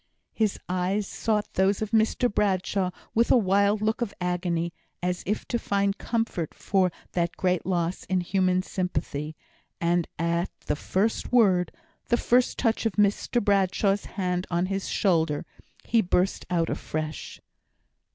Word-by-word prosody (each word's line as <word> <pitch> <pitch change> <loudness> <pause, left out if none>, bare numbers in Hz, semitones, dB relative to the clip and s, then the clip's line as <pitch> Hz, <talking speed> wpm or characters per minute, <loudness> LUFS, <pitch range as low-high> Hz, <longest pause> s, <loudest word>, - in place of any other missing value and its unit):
His 215 -3 +1
eyes 185 +3 0
sought 210 +1 -1
those 190 +1 +2
of 215 - -5
Mr 225 +2 +3
Bradshaw 195 -3 0 0.2
with 230 +1 +3
a - - +6
wild 200 0 +2
look 220 +3 0
of 215 -4 -2
agony, 175 -1 -1 0.3
as 180 0 -1
if 210 +2 -2
to 235 - 0
find 200 -1 0
comfort 225 -9 -2
for 190 -2 +1 0.2
that 170 -1 -1
great 180 -1 0
loss 175 -1 -1
in 185 -1 +1
human 185 0 +1
sympathy; 155 -5 -3 0.4
and 170 0 +1
at 170 +2 0
the 150 - -1
first 195 +8 -1
word 195 -8 +4 0.4
the 240 - +3
first 245 +1 +2
touch 230 -1 +1
of 220 - -3
Mr 210 +3 +2
Bradshaw's 195 0 +2
hand 180 -2 -2
on 175 +1 +1
his 195 +1 -2
shoulder 165 -7 +1 0.4
he 230 -1 +3
burst 180 0 0
out 170 -2 +1
afresh. 155 0 -4
190 Hz, 145 wpm, -26 LUFS, 175-210 Hz, 0.4 s, a